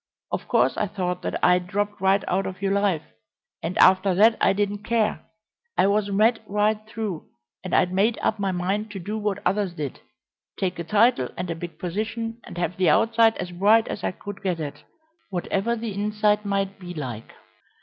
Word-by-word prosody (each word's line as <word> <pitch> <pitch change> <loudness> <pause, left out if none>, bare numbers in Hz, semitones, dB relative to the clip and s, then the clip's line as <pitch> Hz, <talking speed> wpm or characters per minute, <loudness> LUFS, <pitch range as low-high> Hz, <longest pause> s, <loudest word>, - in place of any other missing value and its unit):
Of - - -3
course - - +2
I 210 - 0
thought 180 -2 -3
that - - -2
I'd 180 0 +3
dropped 205 +1 -2
right 195 +1 +3
out 195 +2 0
of 185 - -7
your 195 0 0
life, 200 -6 +1 0.6
and 170 +3 -3
after 185 0 +5
that 220 +4 +6
I - - +5
didn't 205 +1 -1
care. 225 -1 0 0.5
I - - +5
was 205 +1 +2
mad 215 +4 +3
right 210 +1 +1
through, 215 -7 -5 0.4
and 185 - -1
I'd 180 0 +3
made 210 +5 +2
up 220 - +1
my 195 -1 0
mind 195 +4 -1
to 195 - -5
do 205 +5 -4
what 205 -1 -2
others 195 -1 +1
did 145 -4 -5 0.6
take 185 -2 -2
a - - -2
title 210 - +3
and 180 -1 -3
a - - -2
big 170 +1 -8
position, 225 +5 -3
and - - -10
have 175 0 -2
the 185 -3 +3
outside 225 0 +4
as 180 - -5
bright 210 +6 +4
as - - -5
I - - +1
could 200 +2 -8
get 185 -4 -1
it, 150 -3 -6 0.5
whatever 195 +4 -1
the 225 -2 -4
inside 210 +1 +1
might 195 -1 -1
be 175 -1 -8
like. 125 -7 -6
200 Hz, 195 wpm, -24 LUFS, 180-210 Hz, 0.6 s, that